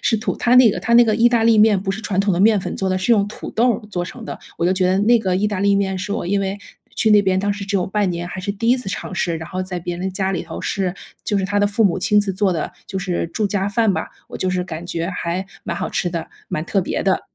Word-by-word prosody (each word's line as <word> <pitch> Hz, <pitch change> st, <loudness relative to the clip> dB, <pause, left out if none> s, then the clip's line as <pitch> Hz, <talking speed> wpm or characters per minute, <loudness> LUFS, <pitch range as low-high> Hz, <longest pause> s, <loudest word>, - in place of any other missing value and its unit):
是 225 Hz, -, +2 dB
土 215 Hz, -, -2 dB
它 240 Hz, +1 st, +2 dB
那 250 Hz, -4 st, +7 dB
个 180 Hz, -, -4 dB
它 235 Hz, +4 st, +1 dB
那 240 Hz, 0 st, +8 dB
个 215 Hz, -2 st, +2 dB
意 230 Hz, +2 st, +5 dB
大 235 Hz, -2 st, +2 dB
利 225 Hz, -1 st, +5 dB
面 210 Hz, -2 st, +5 dB
不 195 Hz, -, -2 dB
是 195 Hz, -, -4 dB
传 195 Hz, -4 st, -3 dB
统 200 Hz, -1 st, +2 dB
的 175 Hz, -, 0 dB
面 215 Hz, 0 st, +5 dB
粉 -, -, -4 dB
做 190 Hz, -, -2 dB
的， 185 Hz, -, +1 dB
是 190 Hz, +6 st, +2 dB
用 205 Hz, -2 st, +3 dB
土 -, -, -8 dB
豆 235 Hz, 0 st, +2 dB
儿 215 Hz, -1 st, -8 dB
做 175 Hz, -2 st, -2 dB
成 225 Hz, +6 st, -8 dB
的， -, -, -6 dB, 0.2 s
我 170 Hz, -, -1 dB
就 180 Hz, -, +3 dB
觉 185 Hz, -1 st, +1 dB
得 185 Hz, +1 st, +2 dB
那 235 Hz, +3 st, +4 dB
个 185 Hz, -4 st, 0 dB
意 210 Hz, +2 st, +1 dB
大 205 Hz, -3 st, -2 dB
利 200 Hz, 0 st, +3 dB
面 190 Hz, -1 st, 0 dB
是 195 Hz, +2 st, -5 dB
我 205 Hz, -, -3 dB
因 200 Hz, +2 st, +1 dB
为 195 Hz, +1 st, -2 dB, 0.4 s
去 220 Hz, -, +2 dB
那 210 Hz, -1 st, +6 dB
边， 190 Hz, -1 st, +1 dB
当 205 Hz, -, 0 dB
时 200 Hz, 0 st, -6 dB
只 200 Hz, 0 st, -1 dB
有 180 Hz, -, 0 dB
半 200 Hz, -1 st, 0 dB
年， 175 Hz, 0 st, -4 dB
还 -, -, -7 dB
是 200 Hz, +1 st, -3 dB
第 230 Hz, +3 st, -2 dB
1 250 Hz, -, +5 dB
次 250 Hz, -, -8 dB
尝 190 Hz, -, -5 dB
试， 170 Hz, -1 st, -1 dB
然 160 Hz, +1 st, -8 dB
后 185 Hz, 0 st, -3 dB
在 185 Hz, -1 st, -5 dB
别 175 Hz, +1 st, -4 dB
人 190 Hz, +2 st, -3 dB
家 190 Hz, 0 st, -1 dB
里 180 Hz, -, -2 dB
头 165 Hz, -1 st, -7 dB
是 185 Hz, -2 st, -1 dB, 0.3 s
就 205 Hz, -, 0 dB
是 190 Hz, -, -1 dB
他 205 Hz, +2 st, 0 dB
的 205 Hz, -, +3 dB
父 205 Hz, +2 st, 0 dB
母 190 Hz, -2 st, +2 dB
亲 210 Hz, +3 st, +3 dB
自 200 Hz, -1 st, -2 dB
做 190 Hz, -1 st, +1 dB
的， 160 Hz, -, -3 dB, 0.2 s
就 190 Hz, -, -4 dB
是 180 Hz, -3 st, -2 dB
住 215 Hz, -, 0 dB
家 195 Hz, -1 st, -1 dB
饭 220 Hz, -1 st, +2 dB
吧， -, -, -3 dB, 0.2 s
我 -, -, -7 dB
就 185 Hz, -, -1 dB
是 185 Hz, -1 st, 0 dB
感 165 Hz, -1 st, -7 dB
觉 170 Hz, 0 st, -3 dB
还 180 Hz, 0 st, -3 dB, 0.2 s
蛮 -, -, -3 dB
好 -, -, -3 dB
吃 175 Hz, -, -1 dB
的， 170 Hz, -2 st, -4 dB, 0.2 s
蛮 155 Hz, -, -2 dB
特 195 Hz, -, -1 dB
别 -, -, -2 dB
的。 190 Hz, -1 st, +2 dB
195 Hz, 335 characters per minute, -20 LUFS, 185-210 Hz, 0.4 s, 那